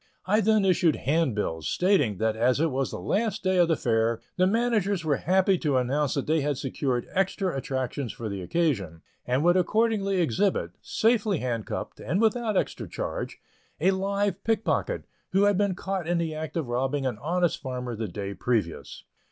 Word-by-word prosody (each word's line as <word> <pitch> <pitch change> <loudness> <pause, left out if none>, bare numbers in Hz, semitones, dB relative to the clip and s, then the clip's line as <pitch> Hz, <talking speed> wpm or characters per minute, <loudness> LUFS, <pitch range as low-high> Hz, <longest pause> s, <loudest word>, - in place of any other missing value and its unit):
I 210 +4 +3
then 215 -1 +3
issued 175 -4 +3
handbills, 115 - 0
stating 180 - +2
that 110 +1 0
as 120 +4 +2
it 160 0 +2
was 135 +1 -1
the - - -5
last 215 0 -1
day 185 0 +2
of 175 -1 +5
the 165 - +2
Fair, 115 -3 +1 0.2
the 185 -1 +3
managers 205 -5 +1
were 145 -3 +2
happy 190 +1 +2
to 145 -4 +1
announce 135 +3 0
that 140 - -1
they 160 0 +2
had 145 -1 -1
secured 130 -2 -2
extra 190 -1 0
attractions 130 -1 -3
for 115 - -6
the 100 -2 -4
occasion, 95 - -1 0.2
and 130 +4 +1
would 175 +1 +4
accordingly 195 +1 +2
exhibit, 175 - +1
safely 220 -4 +1
handcuffed, 120 -5 -4
and 155 - -1
without 225 -1 +1
extra - - -2
charge, - - -4 0.4
a 180 +5 +4
live 200 0 -1
pickpocket, 225 - 0 0.3
who 195 +1 +4
had 205 0 +4
been 200 -1 +1
caught 190 -3 -3
in 175 0 +1
the 165 -2 -1
act 155 +1 -5
of 160 -6 -2
robbing 135 +3 -1
an 120 -5 -2
honest 175 +3 0
farmer 125 -3 -4
the 110 0 -3
day 100 +2 -5
previous. 105 -6 -2
160 Hz, 180 wpm, -27 LUFS, 125-195 Hz, 0.4 s, of